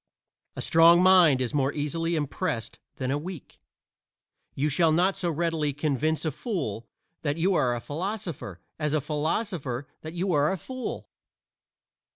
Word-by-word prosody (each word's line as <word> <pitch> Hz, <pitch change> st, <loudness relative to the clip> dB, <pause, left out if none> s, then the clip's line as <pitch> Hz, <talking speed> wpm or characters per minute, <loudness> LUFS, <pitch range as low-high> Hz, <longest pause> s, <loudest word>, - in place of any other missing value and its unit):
A -, -, -4 dB
strong 170 Hz, +2 st, +6 dB
mind 175 Hz, -8 st, +6 dB
is 125 Hz, -, -2 dB
more 140 Hz, -1 st, +2 dB
easily 165 Hz, +3 st, -1 dB
impressed 145 Hz, -5 st, -3 dB, 0.2 s
than 130 Hz, 0 st, -2 dB
a 145 Hz, -, 0 dB
weak; 175 Hz, -1 st, -9 dB, 1.0 s
you 145 Hz, +3 st, +1 dB
shall 160 Hz, +2 st, +3 dB
not 180 Hz, +5 st, +3 dB
so 175 Hz, -, -1 dB
readily 160 Hz, -2 st, 0 dB
convince 155 Hz, +2 st, 0 dB
a 155 Hz, -, +1 dB
fool 135 Hz, -, -4 dB, 0.3 s
that 145 Hz, -1 st, -1 dB
you 185 Hz, +4 st, +2 dB
are 125 Hz, -8 st, +2 dB
a -, -, -3 dB
philosopher 165 Hz, -, -5 dB, 0.2 s
as 150 Hz, 0 st, 0 dB
a -, -, +3 dB
philosopher 150 Hz, -, -2 dB, 0.2 s
that 155 Hz, +1 st, -7 dB
you 180 Hz, +1 st, -1 dB
are 145 Hz, +1 st, +3 dB
a 190 Hz, -, -1 dB
fool. 255 Hz, +6 st, -6 dB
155 Hz, 155 wpm, -27 LUFS, 145-175 Hz, 1.0 s, strong